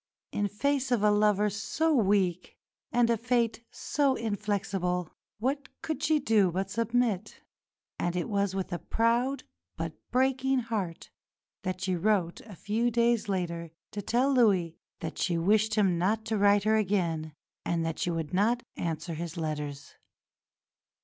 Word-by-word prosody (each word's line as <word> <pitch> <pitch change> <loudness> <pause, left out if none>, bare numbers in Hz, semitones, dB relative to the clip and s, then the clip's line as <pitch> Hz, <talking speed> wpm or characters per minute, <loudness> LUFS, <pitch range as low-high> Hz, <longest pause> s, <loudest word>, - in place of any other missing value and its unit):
In 205 - 0
face 270 +6 0
of 235 -4 +2
a 210 - +5
lover 210 0 +3
so 220 +11 0
weak, 195 - +1 0.3
and 240 -1 +3
a 230 - +2
fate 235 0 0
so 280 -3 0
inflexible, 195 -5 -2 0.3
what 270 +6 -2
could 320 -1 -3
she 310 0 +3
do 220 -9 +3
but 190 +2 -2
submit? 230 -2 0 0.6
And 175 0 -1
it 180 - -1
was 200 -3 0
with 190 -2 -3
a 175 - -2
proud 240 +4 +1 0.3
but 165 0 -3 0.2
breaking 265 +1 +2
heart 205 -8 -4 0.5
that 185 0 -3
she 185 -1 0
wrote 180 -2 +1
a 215 -4 -12
few 220 +7 0
days 235 -2 +2
later 170 -3 -2 0.2
to 205 - -4
tell 250 +7 +2
Louis 195 -10 +3 0.3
that - - -5
she 175 -2 +1
wished 215 +5 +2
him 190 -5 +2
not 215 +5 +1
to 220 -1 -1
write 205 0 +5
to 215 - +1
her 220 - +4
again 170 -7 0 0.3
and 165 -1 0
that 165 0 -3
she - - 0
would 165 -2 -3
not 230 +6 +2
answer 165 0 -3
his 165 +1 -5
letters. 150 -3 -4
205 Hz, 155 wpm, -29 LUFS, 180-235 Hz, 0.6 s, a